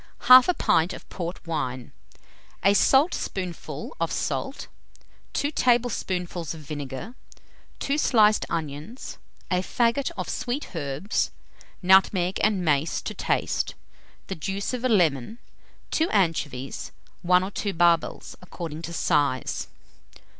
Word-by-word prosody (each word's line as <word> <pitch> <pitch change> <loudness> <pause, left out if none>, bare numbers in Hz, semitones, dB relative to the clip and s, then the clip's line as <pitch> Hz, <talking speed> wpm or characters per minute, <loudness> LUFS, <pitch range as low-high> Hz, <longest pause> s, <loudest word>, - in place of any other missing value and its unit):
1/2 255 +8 +8
pint 165 +2 +2
of - - -10
port 175 0 -6
wine, 130 -7 -3 0.7
a 195 +2 +5
saltspoonful 205 - 0
of - - 0
salt, - - -3 0.7
2 285 - 0
tablespoonfuls 185 - 0
of 160 - -10
vinegar, 145 - -6 0.6
2 280 +2 -1
sliced 215 -6 +4
onions, 155 - -5 0.3
a 180 - +3
faggot 235 +7 +1
of 185 - -3
sweet 245 -4 -4
herbs, 145 +6 -1 0.5
nutmeg 190 0 +4
and 195 -4 +2
mace 150 +1 +1
to - - -5
taste, - - -1 0.5
the - - -4
juice 195 - -3
of 250 -1 -3
a 255 - +2
lemon, 175 - +2 0.5
2 325 +1 +1
anchovies; 155 -9 -1 0.3
1 180 +1 +4
or 190 - -4
2 205 0 -2
barbels, 170 -2 +1
according 165 -3 -7
to 170 - -6
size. 145 -7 0
180 Hz, 120 wpm, -25 LUFS, 160-220 Hz, 0.7 s, 1/2